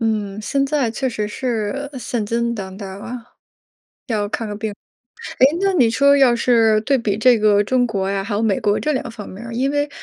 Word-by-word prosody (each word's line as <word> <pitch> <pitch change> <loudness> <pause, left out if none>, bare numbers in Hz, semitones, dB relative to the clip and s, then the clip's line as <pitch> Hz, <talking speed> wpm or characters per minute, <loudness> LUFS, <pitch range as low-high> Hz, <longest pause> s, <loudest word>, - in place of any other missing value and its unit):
嗯， 210 -3 -1
现 275 +6 0
在 275 -4 0
确 260 +4 -2
实 215 -3 -3
是 245 +4 -3
现 235 -3 -3
金 235 +2 -1
当 190 -3 -7
道 200 -1 -7
啊， 200 +6 -7 0.9
要 210 -4 -1
看 225 +1 -3
个 205 - -5
病。 215 0 -4 0.7
诶， 260 - +7
那 390 0 +2
你 255 -11 +4
说 280 +5 +4
要 255 -4 +5
是 225 -3 +3
对 275 +4 +2
比 210 -4 -1
这 240 +2 +4
个 210 -1 +3
中 245 +3 +2
国 195 -4 -2
呀， 195 0 -1
还 205 +1 -4
有 210 - 0
美 210 -4 +1
国 205 0 +1
这 305 - -1
两 260 - -3
方 215 -2 -9
面 200 +5 -10
儿， 235 - -7
因 260 +3 0
为， 290 0 0
225 Hz, 235 characters per minute, -20 LUFS, 210-255 Hz, 0.9 s, 诶